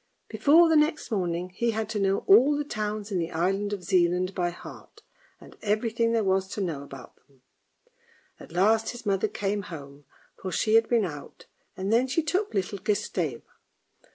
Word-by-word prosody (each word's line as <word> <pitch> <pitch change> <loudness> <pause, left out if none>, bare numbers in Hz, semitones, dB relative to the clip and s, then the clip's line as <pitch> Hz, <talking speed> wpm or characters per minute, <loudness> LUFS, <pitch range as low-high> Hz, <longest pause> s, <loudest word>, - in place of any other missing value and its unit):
Before 325 +4 +5
the 320 - +3
next 305 -3 +1
morning 180 -3 -1
he 235 +6 -1
had 220 -1 -2
to 220 -2 -2
know 195 0 +1
all 260 +9 +6
the 295 - -1
towns 215 -5 -4
in 185 - 0
the 165 -1 -2
island 195 +5 -1
of 200 -3 -4
Zealand 180 0 +1
by 175 -2 0
heart, 175 - -12 0.4
and - - -15
everything 225 +2 0
there 230 -1 +1
was 190 0 +1
to - - -5
know 165 -8 -2
about 135 -2 -12
them. 135 -3 -31 1.0
At - - -13
last 215 +5 +2
his 240 -1 -8
mother 200 +1 +1
came 205 0 -2
home, 145 -6 -10 0.4
for 190 - -4
she 215 +5 0
had 225 0 +4
been 230 -4 +3
out, 145 -5 -9 0.3
and 195 +3 -1
then 245 +3 +3
she 280 +5 0
took 375 +7 -1
little 195 +1 -2
Gustave. 185 - -2
205 Hz, 180 wpm, -26 LUFS, 180-225 Hz, 1.0 s, all